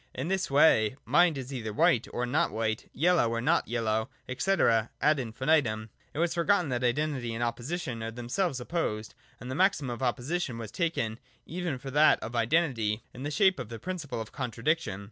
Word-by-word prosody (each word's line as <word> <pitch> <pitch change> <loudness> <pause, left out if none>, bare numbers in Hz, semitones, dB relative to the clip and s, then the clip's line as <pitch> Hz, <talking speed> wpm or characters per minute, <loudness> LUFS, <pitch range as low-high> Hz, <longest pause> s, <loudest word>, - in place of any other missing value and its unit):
In 135 +7 -3
this 190 0 0
way, 135 -6 +5
mind 175 -3 +4
is 135 +1 -6
either 110 -4 -4
white 145 0 +3
or 125 - -1
not 125 +5 +1
white, 110 0 -2
yellow 165 -4 +3
or 115 0 -1
not 160 +8 +2
yellow, 110 0 -1 0.3
&c., 195 - 0
ad 140 - +2
infinitum. 115 -2 0 0.2
It - - -11
was 170 +1 +1
forgotten 175 -1 +2
that 125 -1 -1
Identity 125 -2 0
and 120 - -2
Opposition 120 +2 -3
are 110 - -3
themselves 125 - -2
opposed, 115 -7 -3 0.3
and 125 - -7
the - - -2
maxim 165 -5 +2
of 120 - -6
Opposition 130 +2 -1
was 110 -2 -7
taken 140 -10 -1 0.3
even 175 -4 -3
for 135 +2 -8
that 150 +3 +5
of 115 +2 -6
Identity, 115 -4 +1
in 125 - -10
the 145 - -2
shape 190 +1 +3
of 125 -4 -6
the 115 - -6
principle 160 - -5
of 110 -1 -6
Contradiction. 125 - -1
130 Hz, 185 wpm, -29 LUFS, 115-160 Hz, 0.3 s, way